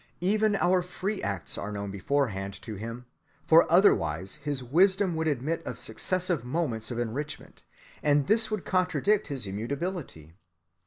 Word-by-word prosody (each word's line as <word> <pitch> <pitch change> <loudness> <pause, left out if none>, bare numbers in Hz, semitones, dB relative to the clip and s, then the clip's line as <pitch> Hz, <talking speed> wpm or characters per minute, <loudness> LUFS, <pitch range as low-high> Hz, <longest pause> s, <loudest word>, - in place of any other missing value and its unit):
Even 210 +3 +2
our 185 -1 +3
free 190 +3 -4
acts 100 -3 -3
are 105 - -4
known 100 -1 -4
beforehand 100 -2 -1
to 110 - -6
Him, 115 +4 -7 0.4
for 165 +1 +6
otherwise 95 - +3
his 145 -3 -2
wisdom 185 +7 +3
would 160 0 -1
admit 150 +3 -1
of - - -5
successive 180 -7 -1
moments 125 -5 -2
of 120 - -4
enrichment, 120 +6 -5 0.4
and 145 -1 +3
this 220 +6 +2
would 215 -3 -3
contradict 190 +3 +1
his 135 -6 -3
immutability. 115 - -4
145 Hz, 145 wpm, -28 LUFS, 110-185 Hz, 0.4 s, for